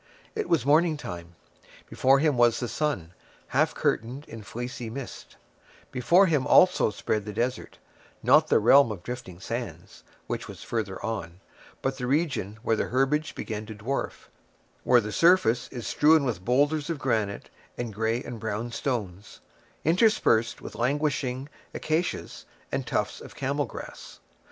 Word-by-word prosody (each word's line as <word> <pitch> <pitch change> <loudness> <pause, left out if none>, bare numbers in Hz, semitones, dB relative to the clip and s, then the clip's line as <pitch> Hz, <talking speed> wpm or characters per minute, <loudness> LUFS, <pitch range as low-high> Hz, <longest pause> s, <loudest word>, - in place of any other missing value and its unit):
It 435 -1 -3
was 145 -8 +2
morning 155 +2 +4
time. 85 -9 -8 0.5
Before 135 +1 +3
him 150 0 +2
was 120 -1 +4
the 120 - -2
sun, 115 - -2 0.4
half - - +2
curtained 125 +7 -1
in 115 - -9
fleecy 120 +2 -6
mist; 135 +2 -8 0.6
before 170 +10 +4
him 150 -6 +1
also 180 -8 +5
spread 105 0 -2
the 105 - -6
desert; 125 +4 -3 0.5
not - - +5
the - - +4
realm 120 +3 +6
of 95 -5 -7
drifting 110 -6 -7
sands, 95 - -6 0.2
which - - -4
was - - -10
farther 105 -5 -3
on, 95 -6 -4 0.4
but 135 0 -1
the 125 - -2
region 135 - 0
where 115 - +2
the - - -1
herbage 135 +5 0
began 110 -1 -5
to 110 - -7
dwarf; 120 +6 -4 0.6
where 125 -1 +5
the 105 0 -5
surface 145 - +4
is 120 -3 -7
strewn 155 0 +4
with 105 -8 -2
boulders 145 - +1
of 165 - -1
granite, 110 -7 -1 0.3
and 120 -3 -4
gray 115 +3 -1
and 120 -2 -7
brown 110 +2 -3
stones, 105 -8 -4 0.5
interspersed 160 - +3
with - - -7
languishing 135 0 -1 0.3
acacias 160 +3 -2 0.3
and - - -2
tufts - - -1
of - - -11
camel - - -1
grass. - - -10
125 Hz, 150 wpm, -27 LUFS, 110-145 Hz, 0.6 s, realm